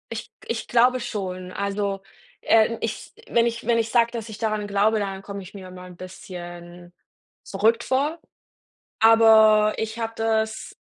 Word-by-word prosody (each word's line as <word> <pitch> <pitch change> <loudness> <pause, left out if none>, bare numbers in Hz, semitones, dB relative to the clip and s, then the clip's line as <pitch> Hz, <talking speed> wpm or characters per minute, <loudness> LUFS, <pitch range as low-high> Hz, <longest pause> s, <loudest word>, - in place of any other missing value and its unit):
Ich 225 - -6 0.2
g - - -17
ich 230 0 -3
glaube 250 +2 +3
schon. 185 -6 -5
Also, 200 0 -2 0.4
äh, 225 +1 +3
ich - - -5 0.2
wenn 235 0 +3
ich 235 -1 -3
wenn 235 0 +2
ich 225 -1 0
sage, 235 -1 +3
dass 230 -2 -6
ich 215 - -8
daran 215 -2 -2
glaube, 205 +2 +2
dann 195 -1 -4
komme 200 0 -7
ich 185 0 -13
mir 190 -2 -10
immer 180 0 -11
'n 180 -1 -12
bisschen 175 -1 -10 0.5
verrückt 220 +4 +1
vor. 290 +5 0 0.8
Aber 220 -1 +6
ich 220 +1 -4
habe 225 -1 -3
das 220 0 -2
215 Hz, 165 wpm, -23 LUFS, 195-230 Hz, 0.8 s, Aber